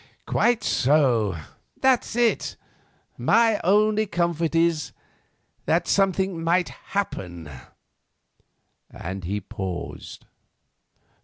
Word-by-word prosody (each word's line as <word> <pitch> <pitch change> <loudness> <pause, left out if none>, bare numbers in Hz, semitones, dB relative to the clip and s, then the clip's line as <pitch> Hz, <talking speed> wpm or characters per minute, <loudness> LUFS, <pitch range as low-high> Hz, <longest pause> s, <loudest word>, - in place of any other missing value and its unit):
"Quite 235 -2 +1
so. 125 - +2 0.4
That's 260 -3 +2
it. 240 -1 +1 0.6
My 225 -2 +3
only 215 +3 +3
comfort 170 -3 -1
is—that 165 -2 -2
something 190 -3 +1
might 175 +2 +2
happen," 90 - -5 1.4
and 95 +2 -7
he 100 +4 -2
paused. 95 -2 -7
170 Hz, 75 wpm, -24 LUFS, -, 1.4 s, My